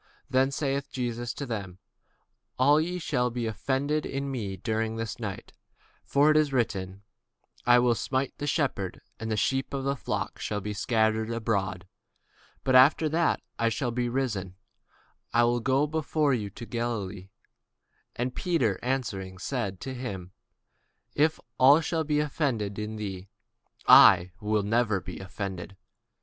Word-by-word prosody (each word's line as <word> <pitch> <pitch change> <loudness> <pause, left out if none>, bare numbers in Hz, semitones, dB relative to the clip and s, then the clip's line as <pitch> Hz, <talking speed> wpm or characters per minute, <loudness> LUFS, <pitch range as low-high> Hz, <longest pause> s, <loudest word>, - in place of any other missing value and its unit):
Then 130 +1 +3
saith 140 0 -2
Jesus 120 -1 -3
unto 140 - -5
them, 100 -7 -5 0.8
All 145 +4 +5
ye 175 +3 -2
shall 130 -7 0
be 120 0 -3
offended 135 +8 -1
because 135 - -5
of 140 - -1
me 120 -8 -3
this 110 +1 -3
night: 100 -4 -6 0.5
for 145 +2 +4
it 155 - +4
is 150 -2 +3
written, 100 -6 -2 0.6
I 120 0 +7
will 120 -1 +4
smite 130 +3 -2
the 145 - -3
shepherd, 135 - -1 0.2
and 110 - -4
the 110 - 0
sheep 135 +6 0
of 135 - -3
the 140 +1 0
flock - - -4
shall 105 - -2
be 105 +1 -4
scattered 110 0 +1
abroad. 100 -5 -2 0.8
But 130 - +1
after 150 +4 +5
I 170 -1 +3 0.3
am 120 +1 -2 0.2
risen 125 -6 0
again, 90 - -16 0.8
I 120 +1 +5
will 120 +1 +2
go 135 +4 +2
before 155 -1 0
you 110 -5 -1
into 110 +4 -9
Galilee. 105 -6 -4 1.0
Peter 130 - 0
answered 125 -6 -1
and 95 -1 -10
said 120 -4 -2
unto 130 +7 -7
him, 100 -8 -6 0.8
Though 150 +2 +5 0.3
all 130 +2 +8
men 160 - +1
shall 160 +1 0
be 150 -1 +1
offended 135 -9 -1
because 105 +1 -4
of 110 - -6
thee, 95 -2 -6 0.6
yet 90 +1 +8
will 105 -1 0
I - - -4
never 110 -2 +2
be 90 0 -8
offended. 95 -1 -6
120 Hz, 155 wpm, -28 LUFS, 105-135 Hz, 1.0 s, all